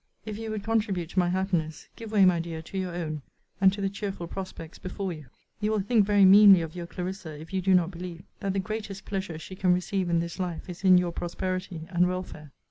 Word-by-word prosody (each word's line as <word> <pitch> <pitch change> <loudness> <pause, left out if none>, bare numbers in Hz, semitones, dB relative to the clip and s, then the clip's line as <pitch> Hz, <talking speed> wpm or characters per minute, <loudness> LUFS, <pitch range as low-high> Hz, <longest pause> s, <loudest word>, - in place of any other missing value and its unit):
If 215 -1 -5
you 225 -1 -5
would 215 -2 -4
contribute 205 -7 0
to 185 - +1
my 175 -1 +3
happiness, 175 -4 -1
give 225 -2 -8
way, 205 -3 +5
my 180 -2 +4
dear, 165 -1 -5
to 180 - -12
your 185 -2 -2
own; 155 -4 -3 0.4
and 190 -1 +7
to 200 +1 -5
the 195 - +1
cheerful 195 -3 -5
prospects 180 -2 -7
before 185 0 -4
you! 155 -4 -11 0.3
You 210 0 0
will 215 -1 +1
think 205 0 +3
very 205 -2 +6
meanly 195 -1 +9
of 160 0 -6
your 175 -1 -5
Clarissa, 180 -4 -6
if 160 +4 -11
you 190 - 0
do 190 +1 +4
not 180 -1 +2
believe, 175 -1 -7 0.2
that 195 -1 -2
the 195 - 0
greatest 205 0 -5
pleasure 190 -5 -3
she 185 +4 -9
can 180 -1 +3
receive 180 0 -1
in 170 -1 +3
this 170 +2 -4
life 180 -3 -3
is 180 +1 -8
in 185 -1 +7
your 180 -1 +1
prosperity 185 0 -4
and 180 0 +3
welfare. 180 -5 -5
185 Hz, 235 wpm, -27 LUFS, 170-195 Hz, 0.4 s, meanly